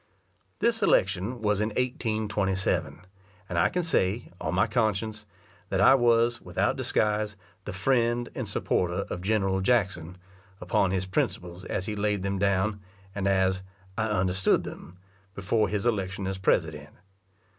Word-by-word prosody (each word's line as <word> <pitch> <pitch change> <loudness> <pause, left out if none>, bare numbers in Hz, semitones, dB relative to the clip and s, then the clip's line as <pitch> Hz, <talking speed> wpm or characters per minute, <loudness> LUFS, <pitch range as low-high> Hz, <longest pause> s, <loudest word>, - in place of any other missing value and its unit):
This 230 -1 +2
election 100 - +1
was 105 -1 +2
in 105 - +1
1827, 105 -7 -1 0.4
and 90 - -4
I 85 - +4
can 180 - -1
say, 110 - 0
on 80 +3 -2
my 95 - +4
conscience, 110 -1 -1 0.4
that - - 0
I - - +7
was, 120 -2 +3
without - - 0
disguise, 105 -1 0 0.3
the - - -4
friend 120 +4 +1
and - - -4
supporter 90 -1 0
of 90 - -4
General 95 -1 +1
Jackson, 95 -6 0 0.4
upon 90 +1 +1
his 95 0 -1
principles 90 -1 -2
as 95 - -3
he 105 - -3
laid 105 -2 0
them 100 0 -1
down, 100 +1 +1 0.3
and 100 -1 -2
as 95 -1 +2 0.3
"I 110 - 0
understood 95 -3 +2
them," 90 - -10 0.4
before 105 +2 +1
his 105 +2 -2
election 95 -4 -1
as 95 0 -3
president. 95 - 0
100 Hz, 145 wpm, -27 LUFS, 95-110 Hz, 0.4 s, I